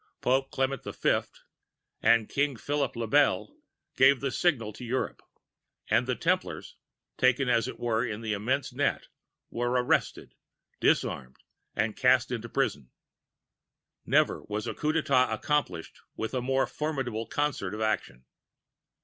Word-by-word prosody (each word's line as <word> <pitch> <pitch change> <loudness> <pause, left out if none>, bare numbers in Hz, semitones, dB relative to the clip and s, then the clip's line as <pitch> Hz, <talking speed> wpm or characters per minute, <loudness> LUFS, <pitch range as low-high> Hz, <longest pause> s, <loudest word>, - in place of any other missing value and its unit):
] - - -56
Pope 135 +1 +2
Clement 135 -1 -1
V. - - +1 0.8
and 115 -2 +4
King 140 -1 0
Philip 145 +2 -2
le 115 0 -2
Bel 145 - +2 0.4
gave 130 0 +6
the 135 0 -2
signal 120 -12 +1
to 125 - -10
Europe, 125 +2 -2 0.7
and - - +3
the - - 0
Templars, - - -1 0.4
taken 130 +1 +3
as 120 -1 +2
it - - -7
were 115 -1 0
in 115 -2 -4
an 110 - -1
immense 120 +7 -1
net, - - -1 0.4
were 120 +1 -1
arrested, 125 0 0 0.5
disarmed, 65 0 0 0.4
and 110 0 0
cast 125 -1 +3
into 120 -1 -4
prison. 75 - -1 1.1
Never - - +2
was 105 0 -3
a - - -3
Coup 150 - 0
d'├ētat 135 -6 +2
accomplished 140 - -2 0.2
with 110 - -4
a 130 - 0
more 135 +1 +1
formidable 130 -7 -3
concert 145 -10 -1
of 110 - -5
action. 65 - -2
125 Hz, 140 wpm, -28 LUFS, 110-135 Hz, 1.1 s, gave